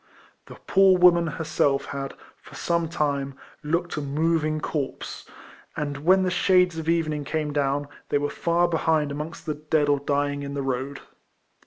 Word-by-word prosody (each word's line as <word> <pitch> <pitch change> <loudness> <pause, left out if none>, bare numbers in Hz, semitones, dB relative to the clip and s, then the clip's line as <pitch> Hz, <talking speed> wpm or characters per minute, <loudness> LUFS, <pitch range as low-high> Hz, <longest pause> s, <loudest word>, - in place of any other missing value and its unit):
The - - -11
poor 190 -1 +5
woman 175 -1 +5
herself 145 -3 0
had, 135 -1 -5 0.2
for - - -15
some 170 -1 0
time, 140 -4 -1 0.3
looked 170 +2 -1
a - - -1
moving 155 +2 0
corpse; 145 -3 -4 0.5
and 145 -2 -2
Avhen 185 +6 +3
the 185 - 0
shades 180 -2 +3
of 160 0 -3
evening 155 -3 0
came 150 0 -2
down, 145 0 0 0.2
they - - +2
were 145 0 0
far 170 +1 +1
behind 160 -3 +1
amongst 150 +5 -6
the 155 - -1
dead 150 0 0
or 145 -1 +3
dying 145 0 -1
in 140 0 -5
the 140 - -2
road. 135 +1 -3
150 Hz, 165 wpm, -25 LUFS, 145-170 Hz, 0.5 s, poor